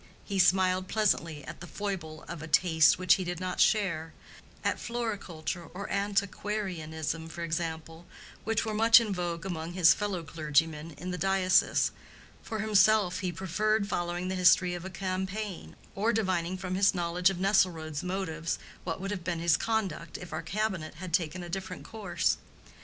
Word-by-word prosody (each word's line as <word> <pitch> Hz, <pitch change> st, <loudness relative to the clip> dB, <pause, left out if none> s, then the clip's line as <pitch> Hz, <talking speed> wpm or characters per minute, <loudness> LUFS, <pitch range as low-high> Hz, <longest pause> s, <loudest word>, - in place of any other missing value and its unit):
He 200 Hz, -2 st, -2 dB
smiled 185 Hz, 0 st, +4 dB
pleasantly 170 Hz, -8 st, 0 dB
at -, -, -8 dB
the 175 Hz, -, -7 dB
foible 175 Hz, -7 st, -5 dB
of 170 Hz, -3 st, -6 dB
a 160 Hz, -, -6 dB
taste 160 Hz, -1 st, +5 dB
which 180 Hz, -2 st, +5 dB
he -, -, -1 dB
did 175 Hz, -1 st, -4 dB
not 185 Hz, -1 st, -3 dB
share—at 170 Hz, -7 st, -1 dB
floriculture 200 Hz, -8 st, -4 dB
or 200 Hz, +1 st, -5 dB
antiquarianism 190 Hz, -6 st, -2 dB
for 170 Hz, +1 st, -6 dB
example, 165 Hz, 0 st, -4 dB, 0.4 s
which 225 Hz, 0 st, 0 dB
were 220 Hz, -, -2 dB
much 225 Hz, +2 st, +7 dB
in 220 Hz, -4 st, -2 dB
vogue 175 Hz, -1 st, -3 dB
among 170 Hz, -2 st, -4 dB
his 175 Hz, -2 st, +6 dB
fellow 200 Hz, -5 st, -3 dB
clergyman 155 Hz, 0 st, 0 dB
in 180 Hz, +3 st, -5 dB
the 180 Hz, -, -4 dB
diocese: 190 Hz, +1 st, +3 dB, 0.5 s
for 220 Hz, -2 st, -4 dB
himself, 205 Hz, -3 st, +4 dB
he 185 Hz, -3 st, -2 dB
preferred 200 Hz, +5 st, 0 dB
following 175 Hz, -1 st, -2 dB
the 185 Hz, -, -2 dB
history 180 Hz, 0 st, +4 dB
of 175 Hz, 0 st, -6 dB
a -, -, -4 dB
campaign, 190 Hz, +2 st, -4 dB, 0.2 s
or 215 Hz, +4 st, +1 dB
divining 185 Hz, -5 st, 0 dB
from 185 Hz, -1 st, -4 dB
his 195 Hz, +1 st, +3 dB
knowledge 175 Hz, +1 st, +2 dB
of 195 Hz, -, -3 dB
Nesselrode's 175 Hz, -6 st, +1 dB
motives 180 Hz, -3 st, -2 dB, 0.3 s
what 165 Hz, -1 st, -3 dB
would 195 Hz, +1 st, -4 dB
have 195 Hz, -4 st, -4 dB
been 170 Hz, 0 st, -2 dB
his 165 Hz, -1 st, +3 dB
conduct 195 Hz, -5 st, -2 dB
if 180 Hz, -, -9 dB
our -, -, -2 dB
cabinet 190 Hz, -7 st, -2 dB
had 175 Hz, +1 st, -8 dB
taken 175 Hz, +1 st, 0 dB
a -, -, -7 dB
different 185 Hz, +1 st, -5 dB
course. 205 Hz, -6 st, -1 dB
180 Hz, 165 wpm, -29 LUFS, 165-195 Hz, 0.5 s, much